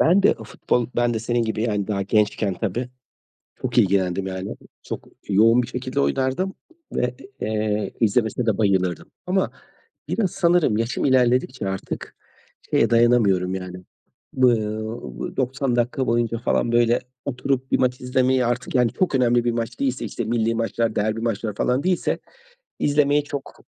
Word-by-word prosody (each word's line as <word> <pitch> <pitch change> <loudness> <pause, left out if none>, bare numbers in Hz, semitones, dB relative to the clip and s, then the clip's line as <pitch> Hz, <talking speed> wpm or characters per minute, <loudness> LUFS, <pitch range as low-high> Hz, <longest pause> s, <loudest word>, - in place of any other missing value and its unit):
Ben 185 +5 +5
de - - +5
o - - -9
futbol 120 -2 -1
Ben 120 -1 +2
de - - 0
senin 120 +1 0
gibi 110 -1 -2
yani 105 -4 0
daha 100 -2 -1
gençken 105 -1 +1
tabii 115 +6 -3 0.7
çok 125 -1 0
ilgilendim 95 -2 +2
yani. 95 0 -5 0.3
Çok - - -7 0.2
yoğun 115 +5 +5
bir - - -4
şekilde 130 +2 -3
oynardım 140 +9 0 0.4
ve, 125 0 -1 0.3
eee, 105 -1 -1
izlemesine 115 +1 +1
de 110 -3 +1
bayılırdım 95 -5 +1 0.2
ama 190 +1 +1 0.6
biraz 205 -5 0
sanırım 170 - +3
yaşım 115 +2 -1
ilerledikçe 130 -3 +2
artık 95 0 -5 0.5
şeye - - +3
dayanamıyorum 115 -6 +3
yani, 90 -1 -6 0.6
ııı, 130 -2 +5 0.7
ııı, - - -5
90 130 -1 0
dakika 125 +2 0
boyunca 115 0 +1
falan 120 0 0
böyle 120 0 +3 0.2
oturup 135 0 -2
bir - - +3
maç 125 -1 +1
izlemeye 130 0 +2
artık 120 +2 -2
yani 125 -3 +3
çok 185 -6 +1
önemli 120 -2 +3
bir 120 - +2
maç 115 +1 -4
değilse, 130 -2 -1
işte, 120 - -4
millî 115 0 +1
maçlar, 115 0 -1
derbi 110 +2 0
maçlar 110 -2 -2
falan 125 +5 +1
değilse 180 -1 0 0.6
izlemeye 145 0 +3
çok 140 -1 -7
120 Hz, 155 wpm, -23 LUFS, 110-130 Hz, 0.7 s, Ben